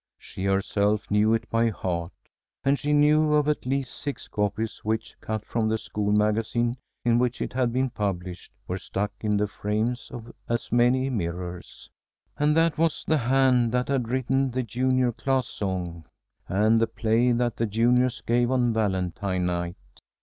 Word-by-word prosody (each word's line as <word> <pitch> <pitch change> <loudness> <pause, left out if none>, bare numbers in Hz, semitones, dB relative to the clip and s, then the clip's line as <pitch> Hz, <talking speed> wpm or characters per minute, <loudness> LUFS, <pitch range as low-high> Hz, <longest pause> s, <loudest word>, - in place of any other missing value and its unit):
She 95 - -7
herself 100 +2 +1
knew 105 +2 +4
it 115 - -4
by 115 0 +3
heart, 90 -4 -3 0.5
and 140 +1 +2
she 145 - -1
knew 150 +1 +4
of 150 -1 +2
at 150 -4 -1
least 135 -1 -1
six 145 -1 -6
copies 105 +2 -2
which, 110 +2 -2
cut 110 -1 -4
from 110 -2 0
the 110 - +1
school 105 -1 -2
magazine 110 +3 +1 0.3
in 120 0 +4
which 125 -1 0
it - - -3
had 125 -2 +1
been 130 +1 0
published, 90 -5 -4 0.2
were 90 +2 -3
stuck 100 +3 -3
in 105 -1 +1
the 105 - +2
frames 110 +4 -2
of 120 0 -9 0.2
as 115 0 -2
many 125 +2 +3
mirrors. 90 -4 -5 0.5
And 150 +1 +2
that 165 -1 +2
was 165 -1 +1
the 155 -1 +3
hand 125 -1 +3
that 125 +1 0
had 130 -5 0
written 130 +1 +1
the 130 +1 -2
junior 125 +2 +1
class 130 +3 0
song 90 -6 -4 0.4
and 110 +4 +3
the 115 - +3
play 115 +3 +2
that 120 -1 0
the 115 - 0
juniors 125 +4 +2
gave 120 +1 +1
on 125 -3 +2
Valentine 95 -3 -1
night. 85 0 -2
115 Hz, 170 wpm, -26 LUFS, 105-130 Hz, 0.5 s, knew